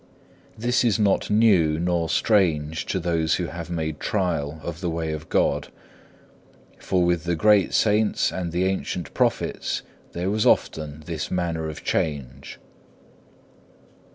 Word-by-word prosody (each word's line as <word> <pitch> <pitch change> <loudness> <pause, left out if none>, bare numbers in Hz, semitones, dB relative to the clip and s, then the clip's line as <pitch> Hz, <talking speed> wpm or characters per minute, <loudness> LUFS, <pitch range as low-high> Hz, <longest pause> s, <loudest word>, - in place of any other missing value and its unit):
This 120 +3 +1
is 115 -5 +2
not 100 -2 +1
new 100 -8 +4
nor 85 -1 0
strange 80 -4 +1
to 95 - -1
those 85 -2 +1
who 90 - -2
have 85 0 -7
made 80 -3 -3
trial 80 -6 -1
of 85 +1 -6
the 90 - -1
way 80 -1 -2
of 80 0 -6
God, - - +1 1.1
for 90 -2 +1
with 85 -2 0
the 85 0 0
great 105 +2 +4
saints 105 0 +2
and 90 -2 -4
the 90 +2 0
ancient 90 -3 -3
prophets - - -1 0.3
there 90 +3 -2
was 110 +1 +1
often 75 -1 +1
this 80 -2 -4
manner 85 -3 -2
of 75 - -8
change. 70 -3 -3
85 Hz, 140 wpm, -24 LUFS, 80-95 Hz, 1.1 s, new